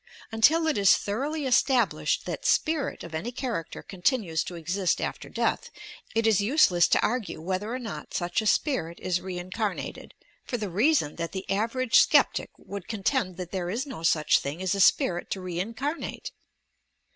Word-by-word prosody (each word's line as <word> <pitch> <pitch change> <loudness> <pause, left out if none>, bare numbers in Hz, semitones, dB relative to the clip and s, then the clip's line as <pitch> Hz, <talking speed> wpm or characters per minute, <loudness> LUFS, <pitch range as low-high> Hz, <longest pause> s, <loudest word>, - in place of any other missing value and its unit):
Until 295 +10 +4
it 310 -8 +1
is 195 -1 +6
thoroughly 280 +9 -3
established 260 0 +2
that - - -5
"spirit" 310 -3 0
of 170 - -9
any 185 +10 -3
character 240 - -4
continues 185 - 0
to 180 - -7
exist 175 +2 -1
after - - -4
death, - - -1 0.5
it 225 0 +2
is 220 -3 +4
useless 200 - +4
to - - +3
argue 230 -6 -1
whether 190 +6 -3
or 250 - -2
not 235 -4 -7
such 175 +3 0
a 215 - -2
spirit 210 - 0
is 180 -1 -1
"reincarnated," 185 +2 -5 0.3
for 245 - -3
the 210 -4 -4
reason 215 - +2
that 170 +1 -4
the 190 0 -5
average 230 +4 +2
sceptic - - +3
would 200 -3 -8
contend 205 -3 -1
that 180 -2 -6
there 180 -2 -3
is 235 +9 -2
no 270 - -8
such 160 -2 +3
thing 140 +4 -5
as 185 0 0
a 200 - -2
spirit 175 -2 +3
to 195 - -3
reincarnate! 220 - -4
200 Hz, 170 wpm, -27 LUFS, 180-250 Hz, 0.5 s, is